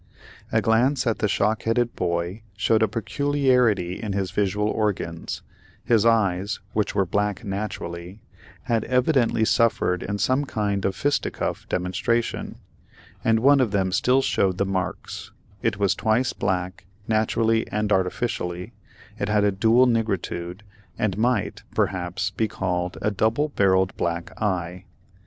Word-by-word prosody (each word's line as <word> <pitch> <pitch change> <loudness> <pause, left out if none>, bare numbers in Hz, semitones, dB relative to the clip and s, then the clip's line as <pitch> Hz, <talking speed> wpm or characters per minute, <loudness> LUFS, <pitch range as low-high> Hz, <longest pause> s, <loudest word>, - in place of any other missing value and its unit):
A - - +2
glance 125 +5 +2
at 115 -2 0
the 105 - +2
shock 105 +1 +1
headed 120 +1 0
boy 85 +4 -2 0.2
showed 110 +3 +2
a 110 - +4
peculiarity 120 -5 +1
in 105 -3 -3
his 95 -2 -2
visual 105 0 0
organs; 100 -7 -2 0.4
his 115 -2 +4
eyes, 100 -3 +1
which 105 -1 0
were 100 -1 +3
black 105 +5 -1
naturally, 95 -2 -5 0.4
had 115 -2 0
evidently 125 -3 +2
suffered 110 -5 +2
in 100 +1 -3
some 130 +7 +1
kind 100 -5 -1
of 95 - 0
a - - -14
fisticuff 145 +5 -1
demonstration, 95 +6 -1 0.7
and 115 0 +3
one 140 +2 +6
of 125 -4 +2
them 95 -2 0
still 125 +6 +3
showed 95 -7 +1
the 100 - +1
marks; 95 -2 -4 0.3
it 110 -3 0
was 100 -2 +2
twice 110 +4 +1
black, 95 0 -2 0.2
naturally 110 +1 +1
and 105 0 -2
artificially; 90 -2 -2 0.5
it - - -1
had 105 -1 +3
a 105 - +3
dual 115 +6 +4
nigritude, 100 -5 -1 0.3
and 105 -4 0
might, 110 -1 0
perhaps, 95 +2 -1
be 110 +3 0
called 90 -3 -2
a 105 - +2
double 110 +9 +1
barrelled 95 -6 +2
black 85 0 -2
eye. 90 -3 -2
105 Hz, 145 wpm, -24 LUFS, 95-115 Hz, 0.7 s, one